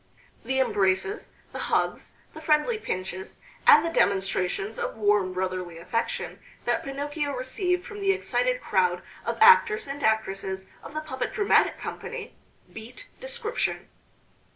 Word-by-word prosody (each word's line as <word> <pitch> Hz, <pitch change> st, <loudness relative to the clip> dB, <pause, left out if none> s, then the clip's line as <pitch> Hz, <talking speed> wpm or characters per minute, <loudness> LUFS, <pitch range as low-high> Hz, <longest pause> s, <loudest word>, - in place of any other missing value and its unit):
The 265 Hz, 0 st, 0 dB
embraces, 205 Hz, -, +1 dB, 0.2 s
the -, -, -6 dB
hugs, -, -, 0 dB, 0.2 s
the 315 Hz, -, -9 dB
friendly 315 Hz, +9 st, +2 dB
pinches, 185 Hz, -, -5 dB, 0.3 s
and 300 Hz, +2 st, +8 dB
the 335 Hz, -, -1 dB
demonstrations 195 Hz, -, +1 dB
of -, -, -3 dB
warm 205 Hz, -3 st, +2 dB
brotherly 185 Hz, -2 st, -3 dB
affection 230 Hz, +7 st, -3 dB, 0.3 s
that -, -, +1 dB
Pinocchio 285 Hz, +1 st, -3 dB
received 360 Hz, +8 st, -1 dB
from 415 Hz, -1 st, -8 dB
the 390 Hz, -1 st, +3 dB
excited -, -, 0 dB
crowd 180 Hz, -2 st, +1 dB, 0.2 s
of -, -, -1 dB
actors 450 Hz, -1 st, +7 dB
and 280 Hz, +1 st, -6 dB
actresses 195 Hz, -3 st, 0 dB, 0.2 s
of 295 Hz, -, -11 dB
the 310 Hz, -, -1 dB
puppet 260 Hz, -4 st, -4 dB
dramatic 410 Hz, -3 st, +3 dB
company 465 Hz, -2 st, -6 dB, 0.4 s
beat 225 Hz, +3 st, -10 dB
description. 480 Hz, -2 st, -3 dB
265 Hz, 130 wpm, -26 LUFS, -, 0.4 s, and